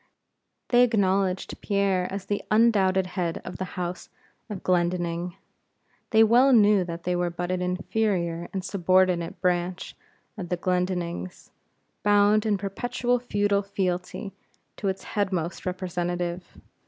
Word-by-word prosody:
They 245 0 +5
acknowledged 195 -5 +1
Pierre 195 -3 0
as 195 -1 -5
the 205 +1 -2
undoubted 200 -4 +3
head 180 -2 -3
of 180 - -7
the 185 - -3
house 180 0 -4 0.4
of 205 -4 -6
Glendinning. 175 -1 0 0.7
They 220 -1 +6
well 245 +5 +5
knew 210 -4 +5
that 170 -1 -6
they 180 0 0
were 175 0 0
but 175 +1 -4
an 185 0 -1
inferior 180 -2 -1
and 190 -1 -4
subordinate 185 -3 +1
branch 180 0 -1 0.4
of 175 -3 -5
the 180 - -1
Glendinnings, 180 - -2 0.5
bound 205 +1 +4
in 205 -2 +2
perpetual 245 +5 -1
feudal 205 -4 +1
fealty 195 0 -3 0.4
to 200 - -3
its 190 0 -2
headmost 185 -5 -2
representative. 175 -1 -3
185 Hz, 130 wpm, -26 LUFS, 175-205 Hz, 0.7 s, They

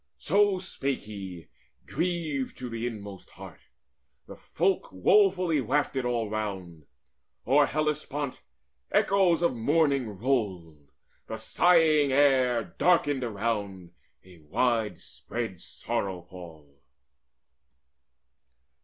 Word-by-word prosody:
So 200 +2 +2
spake 140 -7 -3
he, 95 -6 -9 0.4
grieved 160 -4 -2
to 125 -1 -6
the 115 +1 -3
inmost 100 -5 -8
heart. - - -12 0.7
The - - -11
folk - - -1
Woefully 180 - +3
wafted 130 +1 0
all 120 -2 -1
round. 95 -7 -5 0.6
O'er 140 +4 +4
Hellespont 150 -2 -2 0.5
Echoes 185 -4 +3
of 150 -7 +2
mourning 135 -4 +1
rolled: 95 - -2 0.4
the 110 - -5
sighing 155 +3 +3
air 130 -4 +3 0.2
Darkened 145 -7 +3
around, 100 -5 -3 0.3
a 90 -2 -16
wide 110 +4 0
spread 115 -7 -6
sorrow 95 -3 -4
pall. 80 -6 -14
120 Hz, 95 wpm, -27 LUFS, 95-150 Hz, 0.7 s, O'er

